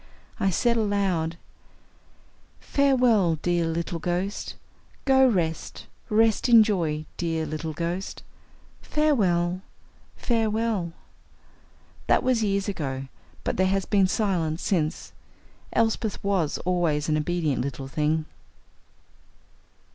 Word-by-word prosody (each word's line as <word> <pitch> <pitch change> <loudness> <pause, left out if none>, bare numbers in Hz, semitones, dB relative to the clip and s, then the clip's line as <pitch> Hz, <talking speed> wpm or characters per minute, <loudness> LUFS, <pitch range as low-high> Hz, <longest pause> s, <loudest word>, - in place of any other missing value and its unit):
I 195 - +2
said 235 +6 +1
aloud: 195 -6 0 1.2
"Farewell, 245 - +3
dear 175 -1 +1
little 165 +1 -2
ghost. 180 +4 -3 0.5
Go 265 -1 +5
rest. 170 -8 -2 0.2
Rest 225 +2 +3
in 230 -2 +9
joy, 165 -8 -1
dear 165 -2 -1
little 155 +1 -4
ghost. 170 +4 -4 0.6
Farewell, 185 - +1 0.5
farewell." 220 -6 0 1.1
That - - +3
was 255 -3 +2
years 200 -1 0
ago, 135 -8 -4 0.3
but - - -2
there 185 +1 +3
has 195 0 0
been 195 -3 +3
silence 180 -6 -1
since. 160 -5 -1 0.6
Elsbeth 225 -2 0
was 190 -7 0
always 170 -5 +1
an 155 - +2
obedient 155 -3 0
little 135 0 -4
thing. 155 +3 0
180 Hz, 100 wpm, -25 LUFS, 160-215 Hz, 1.2 s, in